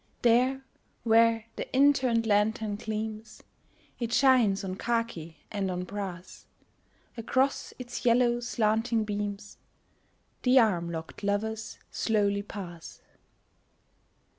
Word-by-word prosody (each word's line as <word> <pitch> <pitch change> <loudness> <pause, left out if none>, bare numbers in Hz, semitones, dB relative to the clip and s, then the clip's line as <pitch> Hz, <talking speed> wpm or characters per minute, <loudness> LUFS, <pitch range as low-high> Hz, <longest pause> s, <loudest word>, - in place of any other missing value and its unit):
There 255 +3 +3 0.4
where 230 0 +4
the - - -5
in 285 +2 +6
turned 240 -4 0
lantern 210 0 +1
gleams 215 0 -5 0.6
It 235 -2 -3
shines 245 -7 +4
on 190 -1 -3
khaki 230 -10 -2
and 200 -2 -2
on 180 0 -3
brass; 190 -2 -7 0.7
Across 260 +4 0
its 245 -1 -7
yellow 240 0 +3
slanting 225 -1 0
beams 205 0 -4 0.8
The 255 +1 +4
arm 180 -8 +3
locked 160 +3 -7
lovers 215 +2 -2
slowly 205 -2 +1
pass. 180 -5 -9
220 Hz, 105 wpm, -28 LUFS, 205-235 Hz, 0.8 s, in